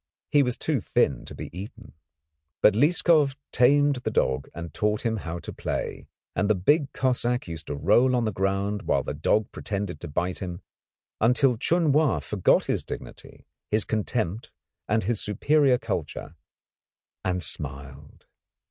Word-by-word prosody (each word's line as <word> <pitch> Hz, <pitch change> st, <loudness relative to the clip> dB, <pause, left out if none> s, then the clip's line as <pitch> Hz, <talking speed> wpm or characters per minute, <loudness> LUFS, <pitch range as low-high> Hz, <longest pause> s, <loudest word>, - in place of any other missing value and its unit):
He 145 Hz, -, +5 dB
was 125 Hz, -3 st, 0 dB
too 150 Hz, -7 st, -1 dB
thin 70 Hz, -8 st, +1 dB
to -, -, -9 dB
be -, -, -8 dB
eaten. 105 Hz, +3 st, -9 dB, 0.7 s
But 105 Hz, -, +7 dB
Lieskov 150 Hz, -, +3 dB, 0.2 s
tamed 145 Hz, +2 st, +4 dB
the 125 Hz, -, -3 dB
dog 65 Hz, +1 st, 0 dB
and 85 Hz, 0 st, -7 dB
taught 105 Hz, 0 st, 0 dB
him 110 Hz, -1 st, +1 dB
how 85 Hz, -3 st, -5 dB
to 85 Hz, -, -8 dB
play, -, -, -4 dB, 0.3 s
and 100 Hz, +4 st, +1 dB
the 110 Hz, -, +4 dB
big 140 Hz, -, +2 dB
Cossack 125 Hz, -2 st, 0 dB
used 80 Hz, -2 st, -7 dB
to 75 Hz, -, -3 dB
roll 115 Hz, -, +3 dB
on 120 Hz, -2 st, +1 dB
the 110 Hz, -, 0 dB
ground 100 Hz, +2 st, -1 dB
while -, -, +2 dB
the -, -, -4 dB
dog 100 Hz, +8 st, +1 dB
pretended 100 Hz, -6 st, -3 dB
to -, -, -7 dB
bite 90 Hz, +5 st, -2 dB
him, 90 Hz, 0 st, -6 dB, 0.6 s
until 125 Hz, +3 st, +4 dB
Chun 160 Hz, +6 st, +2 dB
Wa 150 Hz, +1 st, +3 dB
forgot 100 Hz, -4 st, +2 dB
his -, -, -1 dB
dignity, -, -, -9 dB, 0.2 s
his 105 Hz, 0 st, +2 dB
contempt, 110 Hz, -1 st, -2 dB, 0.4 s
and 110 Hz, +1 st, +2 dB
his 110 Hz, +2 st, -1 dB
superior 135 Hz, +5 st, +3 dB
culture, 85 Hz, -7 st, -5 dB, 0.9 s
and 90 Hz, -2 st, -1 dB
smiled. 70 Hz, 0 st, -6 dB
105 Hz, 155 wpm, -26 LUFS, 90-125 Hz, 0.9 s, But